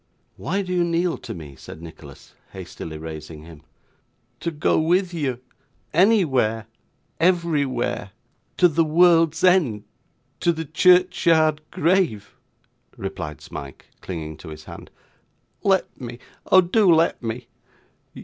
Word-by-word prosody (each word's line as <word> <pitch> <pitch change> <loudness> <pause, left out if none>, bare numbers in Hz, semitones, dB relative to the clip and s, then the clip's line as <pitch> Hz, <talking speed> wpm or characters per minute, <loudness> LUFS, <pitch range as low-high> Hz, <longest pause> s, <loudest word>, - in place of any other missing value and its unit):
'Why 195 +3 -2
do 185 -1 -4
you 175 -1 +2
kneel 170 0 0
to 115 - -7
me?' 75 -5 -10
said 80 - -11
Nicholas, 80 -4 -13 0.2
hastily 80 -1 -8
raising 80 0 -8
him. 80 -2 -13 0.8
'To 170 - -2
go 150 -1 +1
with 175 +3 +1
you 135 -7 -2 0.5
anywhere 145 - +3 0.5
everywhere 155 - 0 0.5
to 180 - +6
the 165 0 +2
world's 165 +1 +4
end 160 - +3 0.6
to 175 - +2
the 160 -1 -4
churchyard 165 -2 +3
grave,' 165 - 0 0.6
replied 75 -7 -6
Smike, 70 -1 -10
clinging 80 -4 -6
to 80 - -11
his 75 0 -10
hand. - - -11 0.7
'Let 190 -7 0
me, 120 -1 -7 0.3
oh 185 - +7
do 185 +2 +3
let 165 +1 +3
me. 115 +1 -5
155 Hz, 120 wpm, -23 LUFS, -, 0.8 s, oh